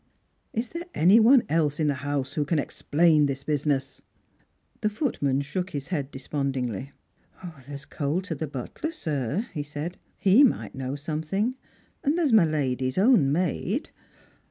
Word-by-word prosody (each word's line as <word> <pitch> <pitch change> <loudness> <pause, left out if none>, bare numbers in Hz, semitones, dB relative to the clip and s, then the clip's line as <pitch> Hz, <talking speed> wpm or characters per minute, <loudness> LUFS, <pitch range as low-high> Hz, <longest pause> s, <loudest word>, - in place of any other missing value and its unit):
Is 230 +1 -3
there 335 +1 -6
any 185 +8 +6
one 240 +3 +6
else 150 -1 +1
in 155 - +2
the 145 - +2
house 140 -1 -3
who 150 - 0
can 155 +3 0
explain 150 +1 +2
this 140 0 -4
business? 145 -2 -1 0.4
" - - -41
The 215 - +2
footman 145 - 0
shook 180 +6 -3
his 140 -2 -5
head 145 -7 -2
despondingly. 135 -3 -3 0.4
" 160 -8 -12
There's 140 -1 -8
Colter 165 +7 -2
the 155 +1 -4
butler, 140 - -5
sir," 155 - -2
he 150 - -2
said; 150 +4 -6
" - - -42
he 210 +9 +7
might 265 - +1
know 130 +1 -4
something, 160 - -2 0.5
and 290 +4 +1
there's 310 -8 +2
my 210 -6 +7
lady's 130 -4 -1
own 195 - +5
maid." 180 - -1
150 Hz, 160 wpm, -26 LUFS, 140-190 Hz, 0.5 s, he